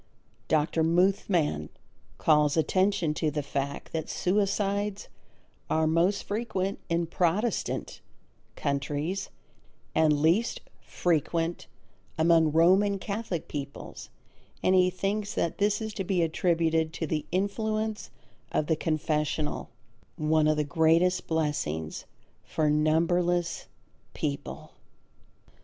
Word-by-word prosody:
Dr. 155 +1 +1
Muthmann 170 - +1 0.5
calls 150 -1 +3
attention 185 0 +2
to 155 0 0
the 150 0 -3
fact 140 0 -4
that 160 -1 -3
suicides 200 +1 0 0.6
are 160 0 +2
most 170 +5 +2
frequent 200 -3 -2
in 170 0 +1
Protestant 180 +6 -1 0.5
countries, 145 +7 -2 0.6
and 155 -2 +3
least 170 +10 +2 0.2
frequent 165 0 -1 0.5
among 160 -1 +4
Roman 190 +5 +4
Catholic 200 -4 -4
peoples, 140 -1 -7 0.5
and 185 - +4
he 185 -1 +5
thinks 200 +3 -2
that 170 - -1
this 205 0 +2
is 220 -1 -4
to 195 - -3
be 185 -2 +1
attributed 165 -1 +1
to 160 - -3
the 150 -1 -2
influence 215 +3 -1 0.4
of 155 - +1
the 160 - +1
confessional, 155 -1 -1 0.5
one 155 -1 +2
of 155 0 +2
the 150 - +2
greatest 165 +4 +2
blessings 150 - -2 0.4
for 155 -1 0
numberless 170 +3 +1 0.5
people. 140 -2 -4
165 Hz, 105 wpm, -28 LUFS, 155-190 Hz, 0.6 s, he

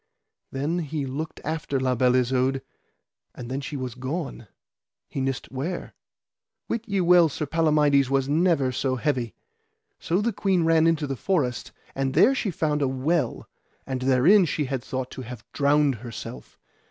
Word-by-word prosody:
Then 145 +6 -1
he 150 -3 -3
looked 150 +5 -5
after 155 -3 -2
La 130 -1 +1
Beale 125 +1 +3
Isoud, 130 +1 +1 0.7
and 120 0 -8
then 135 +2 -2
she 145 +1 -5
was 130 -2 -4
gone 130 - -5 0.6
he 135 - -4
nist 135 -1 -3
where. 150 +7 -4 0.7
Wit 230 0 -3
ye 200 -2 0
well 175 -2 +6
Sir 150 - -3
Palamides 150 -3 +3
was 135 -1 +1
never 155 -3 +2
so 130 +1 -1
heavy. 125 -4 -1 0.6
So 175 +3 0
the 225 +2 0
queen 190 -3 +1
ran 165 0 +4
into 160 -2 +1
the 135 -1 -3
forest, 135 -6 -1 0.2
and 135 -1 -2
there 255 +6 +6
she 245 -6 -1
found 150 -4 -1
a 140 - +2
well, 140 +6 -1 0.4
and 130 -1 -3
therein 135 +10 +5
she 150 -1 -1
had 130 -2 -3
thought 130 0 -4
to - - -7
have 120 -3 -9
drowned 145 0 +3
herself. 115 - -9
140 Hz, 165 wpm, -25 LUFS, 130-165 Hz, 0.7 s, well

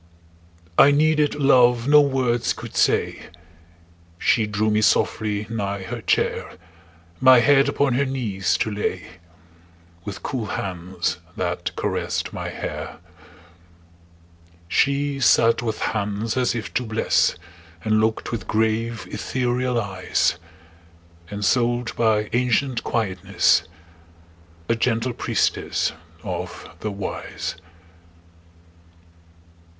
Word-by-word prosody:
I 140 - +8
needed 150 +1 +3
love 125 -4 +4
no 150 +1 +7
words 130 -4 +1
could - - -10
say; - - +1 0.9
She 110 +4 +2
drew 105 +1 0
me 105 0 +2
softly 105 0 +1
nigh 100 -3 -3
her 95 - -6
chair, - - 0 0.7
My 130 -1 +7
head 140 +3 +4
upon 140 -3 +1
her 140 +3 +1
knees 110 -8 -1
to 110 - 0
lay, 100 -3 -3 1.0
With 100 +1 -7
cool 125 -7 -3
hands 90 -2 -3 0.2
that - - -3
caressed - - -2
my - - -4
hair. - - -6 1.7
She 140 +6 +1
sat 115 -3 +4
with 115 -2 -2
hands 110 +1 -2
as 125 -2 +1
if 110 -3 -5
to 125 - 0
bless, 110 -1 +1 0.5
And 110 0 +2
looked 110 0 -1
with 110 -3 -4
grave, 110 +1 0
ethereal 125 -1 -1
eyes; 95 -4 0 0.9
Ensouled 120 +4 0
by 110 -2 +2
ancient 125 +1 +1
quietness, 95 -5 +1 1.0
A - - +2
gentle 115 +1 0
priestess - - 0 0.3
of - - -5
the 105 - -3
Wise. 100 -1 -5
115 Hz, 105 wpm, -23 LUFS, 105-130 Hz, 1.7 s, I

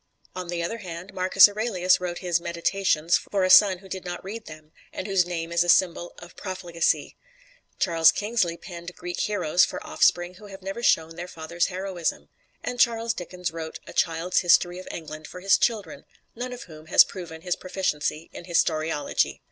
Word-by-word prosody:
On 185 -1 -5
the 170 -1 -3
other 225 +7 -3
hand, 180 -1 -8
Marcus 185 +2 +7
Aurelius 205 -4 +1
wrote 175 -1 -3
his 170 -1 +1
"Meditations" 170 -1 +1
for 195 -2 -2
a 185 - +3
son 190 0 +8
who 190 +2 -15
did 190 0 -6
not 175 -1 -6
read 215 +4 -7
them, 155 0 -12 0.2
and - - -6
whose 195 -3 +2
name 165 -1 -4
is 170 0 +3
a 175 - -3
symbol 175 -1 +2
of 175 0 -13
profligacy; 180 -4 -1 0.6
Charles 165 -3 +5
Kingsley 205 -6 -1
penned 175 -1 -9
"Greek 175 0 -6
Heroes" 180 -5 +2
for - - -1
offspring 175 +1 +2
who 205 +3 -13
have 195 -1 -11
never 195 +5 -5
shown 165 -7 +2
their 175 +1 -5
father's 170 0 -2
heroism; 185 -2 -3 0.3
and 245 - -4
Charles 230 -1 +2
Dickens 180 -1 -5
wrote 160 -1 -6
"A - - -11
Child's 165 +2 +1
History 175 0 +3
of 185 - -11
England" 155 -2 -8
for 180 - -9
his 195 +1 +4
children 200 -11 -1 0.3
none 250 +2 -5
of 250 - -7
whom 155 -2 -13
has - - +8
proven 165 -4 -9
his 180 0 -1
proficiency 165 -4 -2
in - - -9
historiology. 160 -3 0
175 Hz, 185 wpm, -25 LUFS, 170-190 Hz, 0.6 s, son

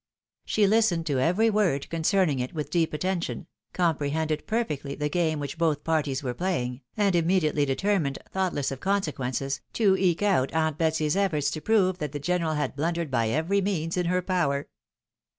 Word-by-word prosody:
She 215 - +1
Hstened 195 -5 +2
to 140 -5 0
every 185 - +3
word 185 -10 +1
concerning 165 -3 +2
it 125 +5 -4
with 150 -2 -4
deep 165 -2 +1
attention, 175 +2 -2 0.3
comprehended 155 -2 -1
perfectly 150 - -2
the 150 0 -2
game 160 -1 0
which 145 +3 -5
both 155 -3 +1
parties 150 -4 0
were 125 -2 -2
playing, 125 -6 -2 0.2
and 200 -3 +2
immediately 165 -4 +2
determined, 145 0 0
thoughtless 180 -8 -1
of 135 - -5
consequences, 140 -8 -1
to 200 -4 +3
eke 185 -1 +1
out 180 -11 +2
aunt 160 -1 0
Betsy's 160 -1 +1
efforts 170 -8 +1
to 155 - -5
prove 185 -1 +2
that 150 -3 -4
the 145 - -3
general 165 0 0
had 150 -2 -2
blundered 165 +1 -2
by 115 -3 +1
every 165 - +1
means 170 -4 -1
in 180 -1 0
her 180 +1 +1
power. 155 -7 0
160 Hz, 170 wpm, -26 LUFS, 145-185 Hz, 0.3 s, every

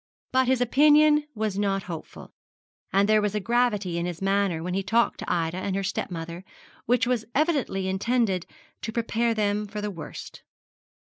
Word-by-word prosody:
But 260 -1 +3
his 260 -1 +2
opinion 300 +4 +5
was 210 -2 -2
not 195 -1 0
hopeful; 170 -5 -9 0.6
and 200 +1 +3
there 215 0 +4
was 210 0 -1
a - - +1
gravity 210 -6 +1
in 170 - -2
his 175 -2 -5
manner 195 -4 0
when 180 +1 -3
he 195 - 0
talked 225 +5 +1
to - - -4
Ida 170 0 0
and 190 0 -2
her 195 - -1
stepmother 170 -1 -4 0.4
which 245 0 +3
was 245 -3 0
evidently 280 - +1
intended 195 -1 0 0.3
to 220 - -4
prepare 230 0 0
them 210 0 0
for 210 +1 -6
the 210 0 -3
worst. 170 -5 -9
210 Hz, 175 wpm, -26 LUFS, 190-240 Hz, 0.6 s, opinion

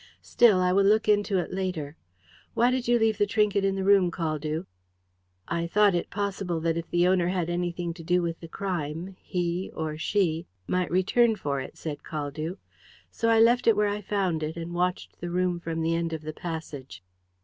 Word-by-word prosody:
"Still, 215 -6 +4
I 180 0 +2
will 200 +1 +4
look 215 +3 +3
into 205 -1 +3
it 180 - -2
later. 180 -6 -3 0.6
Why 240 +2 +4
did 255 -2 -1
you 240 0 +4
leave 220 -2 +1
the 205 - +3
trinket 210 -2 +2
in 195 0 +1
the 195 - -2
room, 195 -2 +5
Caldew?" 155 -2 -3 0.8
"I 170 0 -1
thought 205 +2 +4
it 175 - -1
possible 195 -4 -2
that 165 0 +1
if 170 0 -4
the 175 +1 +3
owner 180 -2 +3
had 180 -2 -1
anything 175 -1 -2
to 165 -1 -11
do 180 +1 +2
with 165 -1 -3
the 165 - -9
crime 175 0 -4
he 175 +1 -2
or 155 -1 -3
she 170 -3 0 0.2
might 180 - 0
return 215 +7 +3
for 145 -8 -2
it," 130 - -9
said 150 -3 -5
Caldew. 155 +4 -4 0.5
"So 230 - 0
I 225 -1 +5
left 235 +2 +4
it 225 - +6
where 210 0 +2
I 205 +1 -3
found 190 -5 -1
it, 155 +2 -4
and 170 +1 -5
watched 180 +1 -2
the 175 - -4
room 180 0 0
from 165 -1 -3
the 165 +1 +1
end 165 0 -1
of 160 -1 -5
the 155 0 -5
passage." 150 - -7
180 Hz, 205 wpm, -27 LUFS, 165-200 Hz, 0.8 s, it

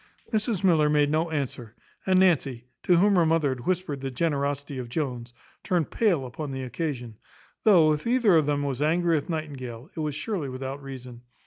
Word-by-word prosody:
Mrs 215 -2 0
Miller 160 -5 +4
made 145 -1 +3
no 160 +2 +1
answer; 130 -7 -4 0.3
and 185 -1 +4
Nancy, 140 -10 +2 0.2
to 180 - +3
whom 200 +2 +4
her 175 - +5
mother 160 -3 +2
had 125 -2 -5
whispered 180 -7 -1
the 135 - -3
generosity 140 -1 -2
of 120 -2 -6
Jones, 125 -4 -3 0.3
turned 175 -5 0
pale 180 - +1
upon 140 +4 -6
the 130 -1 -4
occasion; 125 -4 -4 0.5
though, 170 -8 +6
if 150 +8 -4
either 235 -6 +4
of 155 -3 +3
them 145 -1 0
was 140 -1 -3
angry 170 +3 +2
with 150 - -5
Nightingale, 140 - -5
it - - -6
was 150 -2 -2
surely 160 -3 -3
without 135 +2 -5
reason. 125 -3 -9
150 Hz, 190 wpm, -26 LUFS, 130-170 Hz, 0.5 s, though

